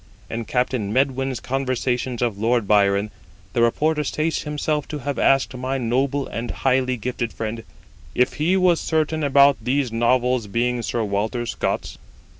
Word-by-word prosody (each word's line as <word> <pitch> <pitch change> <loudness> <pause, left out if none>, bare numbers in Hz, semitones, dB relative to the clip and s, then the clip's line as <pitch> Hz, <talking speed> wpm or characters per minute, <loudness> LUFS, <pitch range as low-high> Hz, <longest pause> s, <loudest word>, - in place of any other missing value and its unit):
In 115 0 -3
Captain 125 -3 -1
Medwyn's 135 0 0
Conversations 130 -2 -1
of 110 -5 -1
Lord 115 -1 +1
Byron 100 0 +3 0.4
the 120 - +1
reporter 150 +6 +2
states 155 +3 -1
himself 150 0 -2
to 150 - -5
have 145 0 -4
asked 135 -1 +3
my 130 +2 -2
noble 130 +3 0
and 115 +1 -5
highly 130 -1 +1
gifted 120 0 -3
friend,' 115 0 -5 0.5
If 125 - +2
he 180 +5 +3
was 180 -3 +3
certain 155 -1 0
about 140 0 +5
these 130 +1 0
Novels 120 0 +1
being 120 +4 0
Sir 115 0 -2
Walter 110 +4 -1
Scott's?' - - -3
125 Hz, 150 wpm, -22 LUFS, 115-140 Hz, 0.5 s, about